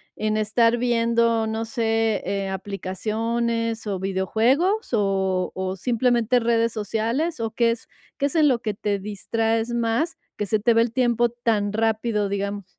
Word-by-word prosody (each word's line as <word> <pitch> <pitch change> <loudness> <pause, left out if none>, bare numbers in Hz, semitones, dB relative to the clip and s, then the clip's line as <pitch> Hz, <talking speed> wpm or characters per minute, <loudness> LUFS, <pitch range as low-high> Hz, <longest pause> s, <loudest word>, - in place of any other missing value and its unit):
en 215 0 -1
estar 230 +2 +2
viendo, 230 -1 +2
no 220 +1 -2
sé, 225 -2 0
eh, 195 +1 -2
aplicaciones 225 +4 -2
o 195 -2 -2
videojuegos? 225 - +1
¿O 190 -3 +1
o 185 0 -2
simplemente 240 +3 +2
redes 230 0 +1
sociales? 230 - -1
¿O 225 -1 -2
qué 230 +1 +2
es 230 - -6 0.3
qué 280 - +1
es 290 - -6
en 310 -2 +5
lo 250 -4 +2
que 215 -3 -2
te 205 0 -1
distraes 225 +3 -1
más, 235 +8 0 0.2
que 210 - -1
se 215 +2 +1
te 230 +3 +3
va 230 - +4
el 230 0 0
tiempo 240 -2 +2
tan 225 -4 0
rápido, 220 -1 0
digamos? 200 0 -3
225 Hz, 160 wpm, -23 LUFS, 205-235 Hz, 0.3 s, en